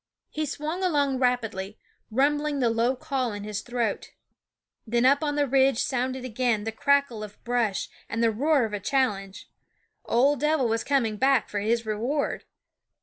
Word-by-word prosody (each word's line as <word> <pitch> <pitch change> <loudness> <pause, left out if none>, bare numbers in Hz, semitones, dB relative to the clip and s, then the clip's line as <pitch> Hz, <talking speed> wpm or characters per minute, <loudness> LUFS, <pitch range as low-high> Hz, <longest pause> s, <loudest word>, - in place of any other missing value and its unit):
He 310 0 -2
swung 310 +6 -4
along 285 -7 +1
rapidly, 225 -6 -1 0.3
rumbling 290 +4 +1
the 240 -4 +2
low 235 +3 +1
call 255 -3 -2
in 205 0 -6
his 210 0 -4
throat. 240 -3 -2 0.8
Then 235 +2 +2
up 280 +2 +5
on 290 -1 -1
the 290 -1 +2
ridge 270 0 +3
rff/he - - -3
Sound 255 0 -1
of 260 - -6
sounded - - -7
again 240 -3 0
the 225 - -3
crackle 280 -2 +1
of 210 -1 -11
brush 235 -5 0 0.2
and 230 +1 -1
the - - +5
&* - - +3
e - - 0
Ofrumpef 215 - -9
roar 290 -3 +3
of 215 - -6
a 205 - -2
challenge. 200 -5 -1 0.6
Ol' 275 +5 +3
Dev'l 300 -2 +1
was 225 0 0
coming 235 -7 +1
back 265 0 +2
for 205 - -2
his 230 +3 0
reward. 235 +7 -2
250 Hz, 195 wpm, -26 LUFS, 220-280 Hz, 0.8 s, up